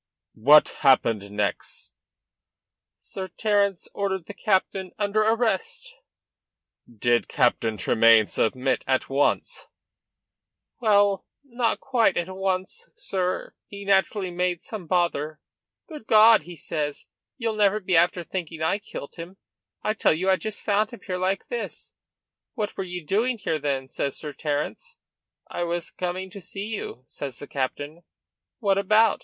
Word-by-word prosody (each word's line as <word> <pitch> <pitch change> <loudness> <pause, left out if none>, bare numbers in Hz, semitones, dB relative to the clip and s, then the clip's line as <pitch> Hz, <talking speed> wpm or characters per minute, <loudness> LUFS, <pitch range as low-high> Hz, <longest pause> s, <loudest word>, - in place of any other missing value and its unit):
"What 145 +7 +6
happened 115 -7 +3
next?" 105 0 -3 1.0
"Sir 190 -1 -7
Terence 200 -3 0
ordered 190 -3 -2
the 205 - -8
captain 190 -2 0
under 210 +1 +1
arrest." 250 - 0 1.0
"Did 120 +1 +1
Captain 110 -2 +1
Tremayne 110 +3 +5
submit 130 +5 0
at 130 -1 +1
once?" 140 +1 0 1.1
"Well, 205 -4 +3 0.2
not 240 -4 -1
quite 250 -4 +2
at 185 +2 -2
once, 190 -1 -2
sir. 185 -1 -2
He 200 0 -9
naturally 195 -1 +2
made 180 -1 -1
some 205 -7 -7
bother. 155 -3 0 0.5
'Good 300 -9 -10
God!' 220 -1 +7
he 175 0 -9
says, 150 -1 -3 0.3
'ye'll 230 -3 -1
never 210 0 +3
be 185 -3 0
after 175 +1 +3
thinking 170 -3 -5
I 185 +6 +1
kilt 170 -7 -9
him? 175 +3 -8 0.5
I 215 - +1
tell 220 - +3
you 185 +5 +1
I - - +5
just 215 +2 -6
found 210 0 +1
him 235 - -11
here 185 -2 -3
like 190 +1 0
this.' 480 - -5 0.6
'What 215 -4 -3
were 195 - -3
ye 180 -2 -6
doing 230 +10 +1
here, 165 -6 -2
then?' 140 -2 -2
says 140 +1 -3
Sir 150 -2 -5
Terence. 155 - -3 0.5
'I 175 - -2
was 170 0 -3
coming 185 +1 -4
to 200 - -9
see 195 +3 -6
you,' 200 - -5
says 135 -3 -7
the - - -8
captain. 145 +4 -4 0.6
'What 200 -4 +2
about? 215 +2 +4
185 Hz, 140 wpm, -25 LUFS, 150-210 Hz, 1.1 s, God